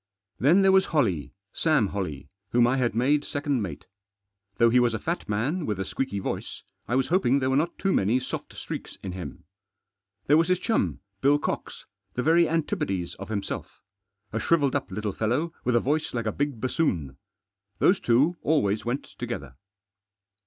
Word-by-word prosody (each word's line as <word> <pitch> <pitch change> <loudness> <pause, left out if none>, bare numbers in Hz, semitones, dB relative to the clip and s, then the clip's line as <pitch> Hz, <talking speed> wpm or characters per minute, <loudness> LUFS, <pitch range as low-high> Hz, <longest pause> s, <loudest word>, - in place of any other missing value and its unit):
Then 170 +9 +5
there 195 - +6
was 190 0 +5
Holley, 100 - 0 0.2
Sam 150 -11 +2
Holley, 80 -9 -4 0.2
whom 120 +2 +4
I 125 +3 +2
had 120 -4 0
made 140 +5 +3
second 145 -4 -1
mate. 80 -8 -5 0.7
Though 115 0 +5
he 125 - +5
was 120 -2 +2
a - - -3
fat 170 -6 -3
man, 130 - 0
with 105 -3 -2
a 95 - -1
squeaky 130 +1 -3
voice, 100 - -4 0.2
I 120 - 0
was 130 0 +1
hoping 160 -7 +3
there 130 -1 +1
were - - +2
not 160 +5 0
too 195 -1 +1
many 110 +6 +2
soft 130 - -6
streaks - - -6
in 95 - -4
him. 90 -1 -7 0.8
There 150 - +5
was 165 +1 +3
his 185 0 +3
chum, 220 +5 0 0.2
Bill 145 +2 +5
Cox, - - -4 0.3
the 125 - -1
very 165 +2 +4
antipodes 100 - -1
of 100 - -7
himself. 100 -3 -4 0.5
A 115 - 0
shrivelled 145 +1 +2
up 140 - -1
little 105 +1 -3
fellow, 130 - 0
with 125 -1 +1
a - - +6
voice 145 +2 -1
like 115 -1 -1
a 110 - +1
big 140 -2 -2
bassoon. 90 - -1 0.6
Those 190 +1 +4
two 140 +9 +3
always 110 -10 +1
went 120 +4 -2 0.2
together. 70 -2 -5
125 Hz, 180 wpm, -26 LUFS, 105-155 Hz, 0.8 s, there